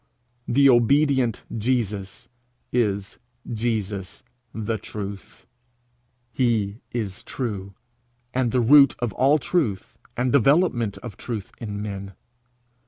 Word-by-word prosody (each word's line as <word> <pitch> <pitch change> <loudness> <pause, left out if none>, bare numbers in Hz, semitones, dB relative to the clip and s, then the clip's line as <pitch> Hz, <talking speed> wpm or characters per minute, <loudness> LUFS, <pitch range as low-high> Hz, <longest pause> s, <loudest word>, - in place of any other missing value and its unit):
The 140 +3 +5
obedient 130 -1 +3
Jesus 110 -2 -2 0.4
is 100 -5 -1 0.3
Jesus 105 -4 -3 0.3
the 110 0 -3
Truth. 100 +1 -8 0.9
He 115 -4 0
is 105 -5 -3
true 100 -6 -5 0.6
and 125 -2 +1
the 125 - +2
root 140 +3 +7
of 120 -4 -2
all 140 +4 +4
truth 130 - -2 0.2
and 125 +1 +1
development 135 - +3
of 115 -6 -8
truth 110 -5 -5
in 105 -3 -5
men. 100 -2 -6
115 Hz, 105 wpm, -24 LUFS, 100-125 Hz, 0.9 s, root